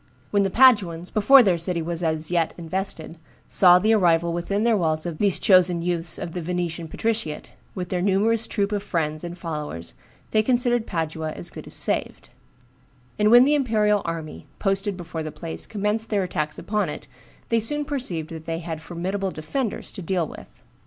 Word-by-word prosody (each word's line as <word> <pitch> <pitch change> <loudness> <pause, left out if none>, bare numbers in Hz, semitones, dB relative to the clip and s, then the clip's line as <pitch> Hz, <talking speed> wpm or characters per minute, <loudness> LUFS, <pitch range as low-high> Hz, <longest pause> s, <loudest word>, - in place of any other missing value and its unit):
When 205 - +3
the 195 - +1
Paduans, 190 -8 +4
before 255 +5 +7
their 180 -5 +2
city 170 +1 0
was 170 +1 -3
as 160 -1 -1
yet 170 -2 0
invested, 170 -1 -5 0.3
saw 180 -2 +6
the 215 +5 +3
arrival 170 -4 +3
within 195 +5 -1
their 235 -1 +3
walls 160 -4 0
of 170 -3 -5
these 200 -3 +3
chosen 180 -3 +4
youths 170 -2 -1
of 170 - -5
the 180 - -4
Venetian 170 -1 -3
patriciate, 215 -4 -3 0.2
with 180 -2 -4
their 180 -1 -1
numerous 210 +4 +1
troop 200 -1 -1
of 205 -1 -1
friends 160 -6 -2
and 175 0 -6
followers, 150 - -6 0.4
they 215 - +4
considered 240 0 +2
Padua 160 -2 -3
as 85 - -4
good - - -10
as - - -5
saved; - - -1 0.9
and 210 0 +4
when 240 +2 +8
the 290 +3 +3
imperial 215 -7 +2
army, 165 -2 -6
posted 195 -1 -1
before 170 -2 -6
the 155 -1 -5
place, 165 +1 -6
commenced 210 +1 -1
their 205 -3 +1
attacks 155 -4 -3
upon 210 -4 -1
it, 150 - -7 0.4
they 230 - +3
soon 295 +7 0
perceived 180 - -3
that 160 -1 -8
they 165 0 -3
had 165 -2 -6
formidable 185 +4 -3
defenders 195 - -4
to - - -8
deal 175 -1 -1
with. - - -13
180 Hz, 185 wpm, -24 LUFS, 165-210 Hz, 0.9 s, when